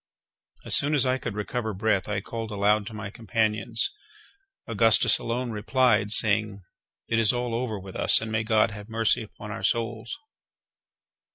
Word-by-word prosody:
As - - +4
soon 145 +2 +3
as 135 - +4
I 130 0 0
could 115 -5 -6
recover 110 0 -4
breath, 100 -1 -1
I 105 -1 -2
called 115 +1 -6
aloud 105 0 +1
to 115 - -8
my 105 -2 -7
companions. 110 0 -1 0.7
Augustus 115 -2 +4
alone 120 +1 -3
replied, 110 -1 +1
saying: 105 -2 +3 0.4
"It 115 - 0
is 115 -2 +3
all 120 -1 -3
over 115 -3 -3
with 95 0 -11
us, - - +4
and 110 0 -6
may 110 0 -1
God 110 0 +2
have 105 +1 -10
mercy 115 0 +2
upon 110 0 -10
our 110 - -6
souls!" 115 - -2
110 Hz, 165 wpm, -25 LUFS, 105-115 Hz, 0.7 s, As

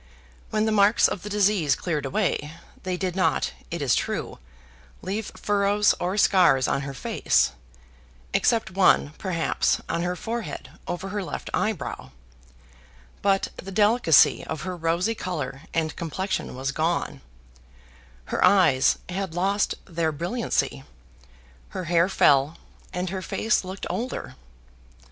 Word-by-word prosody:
When 215 0 +1
the 220 - +1
marks 205 +1 +5
of 185 - -4
the 210 - -7
disease 200 -7 +2
cleared 150 -6 -2
away, 160 -3 -1 0.3
they 185 -1 -3
did 185 -1 -2
not, 190 - +1 0.2
it 170 -3 -3
is 130 - +2
true, - - -2 0.6
leave 205 +3 -3
furrows 205 0 +2
or 185 +3 -1
scars 170 -11 +4
on 140 - 0
her 140 0 -5
face 125 - +1 0.8
(except 225 -5 +2
one, 185 -6 +4
perhaps, 175 -4 0
on 170 +1 -1
her 180 +1 -1
forehead 230 +4 -5 0.2
over 175 +2 -4
her 205 0 -3
left - - -6
eyebrow); 195 - -2 1.1
but 195 -1 +2
the 195 - -8
delicacy 210 - +4
of 160 -1 -5
her 185 0 -4
rosy 170 +6 0
color 150 - -4
and 160 -2 -1
complexion 185 -1 -3
was 135 +2 -2
gone: 160 - -1 1.1
her - - +1
eyes 180 -10 +5
had 185 -2 -4
lost 195 +3 +1
their 165 -2 -1
brilliancy, 175 - -2 0.9
her 185 - -5
hair 170 +1 +2
fell, 145 -2 +3 0.3
and 180 0 -3
her 190 -1 -3
face 220 +4 0
looked 190 +1 -6
older. 250 +3 -4
185 Hz, 135 wpm, -25 LUFS, 165-200 Hz, 1.1 s, marks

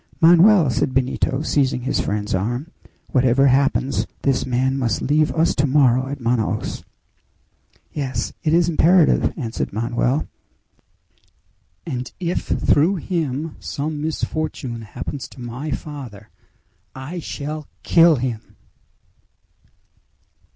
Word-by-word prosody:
"Manoel!" 170 -1 +6
said 130 +2 -1
Benito, 130 +2 0
seizing 135 -5 +1
his 130 - -1
friend's 105 0 -2
arm, 120 - -2 0.4
"whatever 130 0 +3
happens, 135 0 +2 0.2
this 135 -2 +1
man 130 +2 +1
must 120 -6 0
leave 150 +2 +2
us 165 +1 +2
tomorrow 130 -3 +3
at 140 +1 -5
Manaos." 115 -2 -1 1.1
"Yes! 135 -3 -3
it 155 - +1
is 170 +1 +4
imperative!" 170 0 +4
answered 115 -7 -3
Manoel. 120 +6 -1 1.6
"And 125 -5 -4
if 175 -1 -2
through 165 +7 +2
him 160 -4 -3
some 150 +1 -4
misfortune 155 -6 -3
happens 125 +5 -6
to - - -16
my 125 +5 -6
father 130 -8 -7 0.6
I 140 +7 -6
shall 150 -1 -6 0.2
kill 165 -1 +5
him!" 120 -4 -4
135 Hz, 110 wpm, -21 LUFS, 125-155 Hz, 1.6 s, Manoel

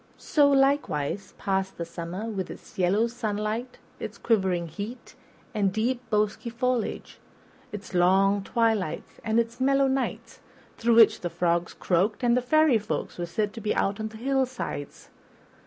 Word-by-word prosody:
So, 295 -6 +3
likewise, 270 - +1
passed 190 -1 -1
the 170 - -3
summer 170 +4 -6
with 195 -5 -4
its - - -11
yellow 190 +5 +3
sunlight, 225 +1 -3 0.2
its - - -6
quivering 190 -6 +1
heat 205 +9 -7 0.4
and 200 -3 +1
deep, 235 +5 0
bosky 215 +2 0
foliage, 245 0 -2 0.5
its 205 -2 -8
long 195 +3 +4
twilights 220 -7 -1
and 220 +1 +2
its 235 +2 -2
mellow 275 +1 +4
nights, 240 -4 -2 0.4
through 230 0 +2
which 225 -2 +6
the 175 - -2
frogs 170 0 0
croaked 195 +7 0
and 245 +1 +3
fairy 305 -2 +4
folk 160 -8 -4
were 175 - -2
said 205 +4 -1
to 225 - -8
be 210 - -1
out 200 +2 0
on 220 - -2
the 220 0 -10
hillsides. 260 - -3
215 Hz, 150 wpm, -26 LUFS, 190-240 Hz, 0.5 s, which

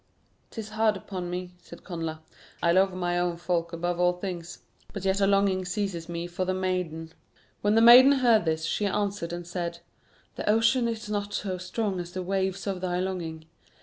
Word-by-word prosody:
"'Tis 220 -2 -7
hard 215 -1 +1
upon 185 -2 -6
me," 180 0 -4
said 170 -1 -13
Connla; 165 -3 -5 0.4
"I 170 - +4
love 190 +2 +4
my 175 -1 -1
own 175 -1 -1
folk 170 -1 -1
above 175 +1 -2
all 180 0 +4
things; 180 -2 -6 0.3
but 200 -2 -6
yet 190 +1 +1
a 195 - +4
longing 195 -1 +2
seizes 180 -3 -3
me 170 0 -3
for 175 +1 -3
the 185 0 -1
maiden." 180 -4 -3 0.5
When 205 +1 +2
the 225 - +5
maiden 250 +4 +9
heard 240 -6 +4
this, 160 0 0
she 205 +4 0
answered 200 -4 -2
and 175 0 -5
said: 170 -1 -4 0.6
"The - - -2
ocean 230 +3 +3
is 225 -2 -4
not 205 -1 -3
so 185 -3 -3
strong 190 +1 -2
as 175 0 -6
the 185 - -3
waves 190 +1 -1
of 195 -3 -3
thy 180 -1 -1
longing. 170 -4 -4
185 Hz, 190 wpm, -27 LUFS, 175-205 Hz, 0.6 s, maiden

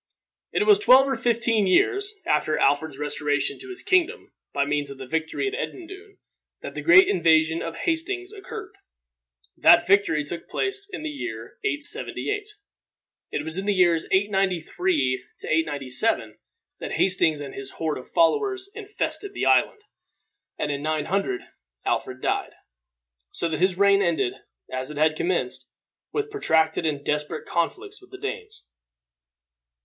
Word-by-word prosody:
It - - +1
was 415 -1 +6
twelve 270 -9 +6
or 270 - 0
fifteen 230 -3 +1
years 405 - +2
after 150 0 +1
Alfred's 145 +1 +1
restoration 145 -1 -1
to 385 - -8
his 375 0 -8
kingdom, 370 -2 +1 0.2
by 140 - 0
means 145 0 -1
of 140 - -9
the 135 - -8
victory 160 - -2
at 400 - -3
Edendune, 395 -2 -7 0.4
that - - -7
the - - -5
great 355 +2 +7
invasion 160 - +3
of 165 0 -5
Hastings 365 - -2
occurred. 410 0 -8 0.8
That - - +6
victory 195 -5 +3
took 165 +3 -8
place 400 0 -2
in 365 - -6
the 315 - -3
year 115 - -7
878. 420 +4 -1 0.8
It - - -3
was 160 +2 -4
in 195 +1 -3
the 205 - +2
years 175 -3 +3
893 195 - +1 0.2
897 150 - 0 0.4
that - - -5
Hastings 165 -5 +2
and 145 -1 -7
his 135 0 -7
horde 155 -4 -2
of 125 - -13
followers 390 +2 +1
infested 415 -1 -4
the - - -1
island, 425 - +3 0.7
and 150 - -1
in 140 0 -3
900 155 0 -1 0.4
Alfred 130 0 -2
died, - - -1 0.8
so 170 - -1
that 155 - -2
his 185 0 +2
reign 200 0 +5
ended, 170 -9 +1 0.4
as 130 +1 -2
it 150 - -8
had 155 +1 +3
commenced, 370 - -1 0.4
with 430 0 -2
protracted 160 - +1
and 145 -2 -3
desperate 150 0 -2
conflicts 400 - -2
with 375 - -18
the 385 - -10
Danes. 435 +1 -6
195 Hz, 145 wpm, -24 LUFS, -, 0.8 s, great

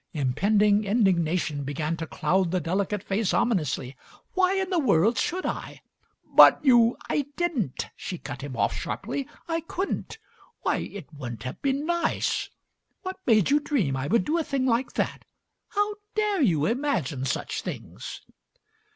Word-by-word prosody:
Impending 200 +9 +3
indignation 180 -8 +1
began 150 +4 -2
to 160 -1 -5
cloud 180 +5 +1
the 185 +2 +1
delicate 190 +4 -1
face 200 0 0
omi 240 - +3
nously. 135 -4 -3 0.4
"Why 375 0 +3
in 385 0 -1
the 355 - +2
world 225 - +3
should 370 +2 -1
I?" - - -5 0.5
"But - - +9
you 240 -3 +5
" - - -15
"I 290 -2 0
didn't!" 285 - -1
She 180 - -5
cut - - -7
him 135 -3 -6
off - - +1
sharply. 250 +6 -4 0.2
"I 330 -1 0
couldn't. 370 +6 -4 0.5
Why, - - +2
it 180 -6 -7
wouldn't 120 -6 -7
have 130 - -6
been 275 +1 0
nice! 340 +1 0 0.5
What 375 0 -4
made 215 -2 +4
you 295 - +5
dream 255 - 0
I 135 +1 -2
would 205 +3 +2
do 330 +3 +1
a - - 0
thing 275 -3 -1
like 245 +1 +1
that? - - -2 0.4
How 415 +1 0 0.2
dare 420 -4 +1
you 165 - +3
imagine 225 - -1
such - - -2
things!" - - -7
210 Hz, 160 wpm, -26 LUFS, -, 0.5 s, But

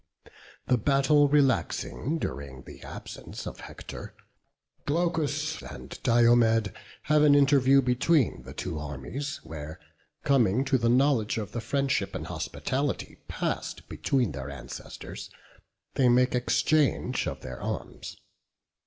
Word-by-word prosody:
The 125 -2 +2
battle 140 +4 +4
relaxing 145 +1 +1
during 70 - -5
the - - -12
absence - - -8
of - - -7
Hector, - - -9 0.7
Glaucus 155 -1 0
and - - -9
Diomed 115 -3 +4 0.3
have 150 0 +3
an 145 -1 +6
interview 140 -1 +5
between 125 - +2
the 65 +1 -11
two 80 -2 -4
armies; 75 - -5
where, 80 -1 -8 0.4
coming 130 -2 +3
to 135 -1 +2
the 115 0 +2
knowledge 125 -4 +3
of 105 -2 -4
the 120 - -4
friendship 135 +3 0
and - - -4
hospitality 140 +1 -3
past - - -3
between 125 - 0
their 70 0 -6
ancestors, 65 -2 -8 0.6
they 130 -2 +3
make 125 +1 +4
exchange 125 +1 +1
of - - -4
their 65 -1 -8
arms. - - -5
125 Hz, 120 wpm, -28 LUFS, 105-145 Hz, 0.7 s, an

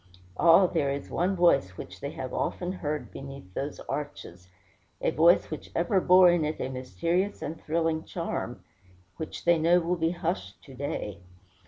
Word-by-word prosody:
Ah, 170 - +6
there 160 -5 0
is 140 0 -4
one 185 +3 +1
voice 140 - +3
which 90 +2 -9
they 140 - -4
have 130 -4 -6
often 180 0 -2
heard 150 -5 -4
beneath 135 -9 -10
those 140 +7 -4
arches 115 -11 -6 0.5
a - - +1
voice 165 +5 +4
which 155 - -6
ever 185 +3 +2
bore 180 0 +7
in 175 -2 +2
it 155 +1 -2
a - - -2
mysterious 170 +10 -1
and 155 +1 -5
thrilling 160 0 0
charm - - -4 0.5
which 160 - -6
they 170 -1 +4
know 170 +3 +4
will 175 +1 0
be 165 0 +1
hushed 175 +1 -3
to 135 - -13
day. 125 -7 -4
160 Hz, 170 wpm, -28 LUFS, 140-175 Hz, 0.5 s, bore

